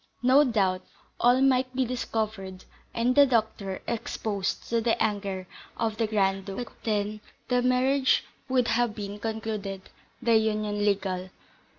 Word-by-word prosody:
No 260 +4 +6
doubt, 195 -8 +1 0.4
all 245 +2 +4
might 260 -1 +2
be 260 0 +2
discovered, 215 -6 -3 0.3
and 235 +2 +1
the 285 +1 +7
doctor 215 -5 -1
exposed 215 -3 -3
to 230 0 +1
the 225 0 +1
anger 200 -3 -1 0.3
of 220 -2 -1
the 225 -1 +1
Grand 195 -2 +1
Duke, 195 -1 -6
but - - -27
then 210 -1 -1 0.3
the 250 -1 +3
marriage 260 +2 +3 0.3
would 255 -2 +2
have 230 -1 +1
been 205 -1 -6
concluded, 215 -3 -4 0.3
the 235 -2 +3
union 215 -1 0
legal. 190 -2 0
220 Hz, 145 wpm, -27 LUFS, 200-245 Hz, 0.4 s, the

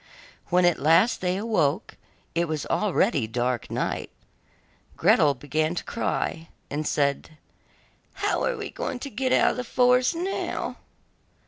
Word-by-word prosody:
When 180 0 +3
at 175 - +3
last 165 - +4
they 180 0 0
awoke, 195 -5 0 0.4
it 170 +1 0
was 155 -2 -3
already 190 - +1
dark 120 +1 -2
night. - - -2 0.9
Gretel 145 -2 +4
began 155 +5 -1
to - - -3
cry 165 -7 -3 0.2
and 150 +1 -2
said: 145 +2 -1 0.8
'How - - 0
are - - 0
we 425 -1 -6
to 280 - -4
get 255 +3 -1
out - - +4
of - - -6
the 250 - -2
forest 250 +4 +3
now? 370 +4 -3
175 Hz, 135 wpm, -25 LUFS, 150-245 Hz, 0.9 s, last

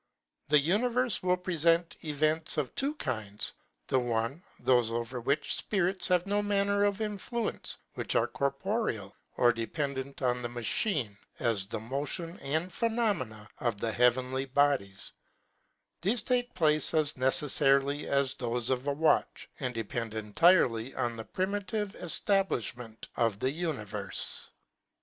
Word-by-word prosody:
The 150 - +5
univerfe 235 - +2
will 180 0 +2
prefent 170 -1 +2
events 155 +1 +1
of 145 -4 -1
two 280 +3 0
kinds; 110 - -2 0.3
the 130 - +2
one, 120 +5 -1 0.2
thofe 120 -3 +3
over 120 +2 -3
which 140 +5 +1
fpirits 190 -2 +1
have 180 -1 +2
no 205 +1 +1
manner 200 0 +2
of 205 +1 0
influence, 215 +2 -2 0.2
which - - -1
are - - +4
corporeal, 140 - -2 0.2
or 120 -1 +5
dependant 135 +3 -4
on 125 -1 +1
the 120 - -3
machine, 120 - 0 0.2
as 105 -5 +1
the 105 - -4
motion 145 - -3
and 160 +6 -2
phenomena 200 - -1
of 115 -5 -1
the 115 - -1
hea 125 +2 +6
venly 130 +2 -4
bodies; 130 -9 +1 0.9
thefe 210 +5 0
take 245 -1 0
place 155 -1 +3
as 155 -1 +3
neceffarily 140 +1 +2
as 140 -1 +1
thofe 120 0 -1
of 130 +2 -1
a 145 - +2
watch, 155 +2 +1
and 125 -3 -3
depend 115 0 -3
entirely 115 - +3
on 120 -1 -1
the 110 -1 -7
primitive 205 +2 -2
eftablifhment 125 - -1
of 115 -4 +1
the 130 +5 0
univerfe. 105 - -1
140 Hz, 135 wpm, -30 LUFS, 120-185 Hz, 0.9 s, hea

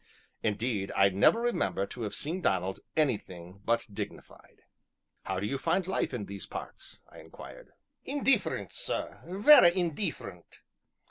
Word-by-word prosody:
Indeed, 105 -2 -1
I 100 0 +5
never 100 - +4
remember 235 - 0
to 120 - -9
have 105 -2 -3
seen 165 +6 -3
Donald 95 - 0 0.2
anything 100 - -2
but 115 +2 +1
dignified. - - -8 0.6
"How 95 -1 -2
do 100 - -3
you 135 +6 -2
find 170 +5 +1
life 190 - -1
in 120 -6 -4
these 100 0 -7
parts?" - - -8
I - - -13
inquired. - - -12 0.3
"Indeefferent, 275 -1 0
sir - - -3
vera 195 +3 +7
indeefferent! 165 - -4
120 Hz, 135 wpm, -30 LUFS, -, 0.6 s, vera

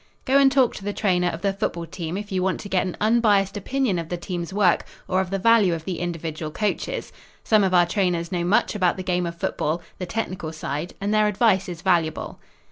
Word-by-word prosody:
Go 275 +1 +4
and 275 -1 +5
talk 265 -3 +3
to - - -9
the 205 +1 -2
trainer 180 -4 +1
of 170 +1 -4
the 200 -1 +1
football 170 -3 -3
team 165 +1 -5
if 205 0 -7
you 185 -1 0
want 190 0 0
to 200 - -8
get 185 0 +1
an 180 - -5
unbiased 210 -3 +3
opinion 220 -2 0
of 165 -1 -6
the 175 - -2
team's 175 0 -5
work 195 -3 +3 0.2
or 185 +1 +2
of 190 - -4
the 195 - -1
value 205 -3 +4
of 160 -1 -8
the 185 -3 -3
individual 165 -2 -4
coaches. 210 +6 -2 0.3
Some 215 -2 +4
of 190 - +2
our 175 -1 +6
trainers 175 -2 -1
know 175 -2 -1
much 180 +5 +2
about 185 -4 +1
the 185 - -4
game 180 -1 0
of 170 0 -6
football 160 0 -1 0.2
the 180 - -4
technical 185 -6 -3
side 155 +2 -4
and 205 +2 -1
their 215 0 +4
advice 200 -2 +2
is 175 -1 -7
valuable. 160 -2 0
185 Hz, 230 wpm, -23 LUFS, 170-205 Hz, 0.3 s, our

